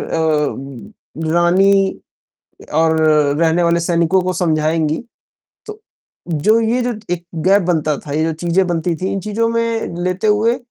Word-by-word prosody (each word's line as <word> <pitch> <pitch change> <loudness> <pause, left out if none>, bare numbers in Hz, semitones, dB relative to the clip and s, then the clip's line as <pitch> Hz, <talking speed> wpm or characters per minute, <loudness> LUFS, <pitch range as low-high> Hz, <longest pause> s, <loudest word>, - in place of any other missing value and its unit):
अ, 150 -2 -3
रानी 190 +3 +3 0.8
और 160 0 +3 0.4
रहने 165 +1 +2
वाले 170 0 +2
सैनिकों 170 +2 +1
को 185 0 -2
समझाएँगी। 155 -2 0 0.7
तो 430 0 -9 0.5
जो 190 +8 +2
ये 230 +3 0
जो 245 0 -1 0.2
1 175 0 -6 0.2
गैप 200 +2 +4
बनता 155 -4 0
था, 145 - -10
ये 155 - 0
जो 160 0 -1
चीज़ें 175 +4 0
बनती 170 0 -1
थी, 185 +4 -3
इन 195 - -2
चीज़ों 215 +3 -1
में 230 -5 -2
लेते 185 +4 -1
हुए 220 +3 +2
175 Hz, 145 wpm, -17 LUFS, 160-200 Hz, 0.8 s, गैप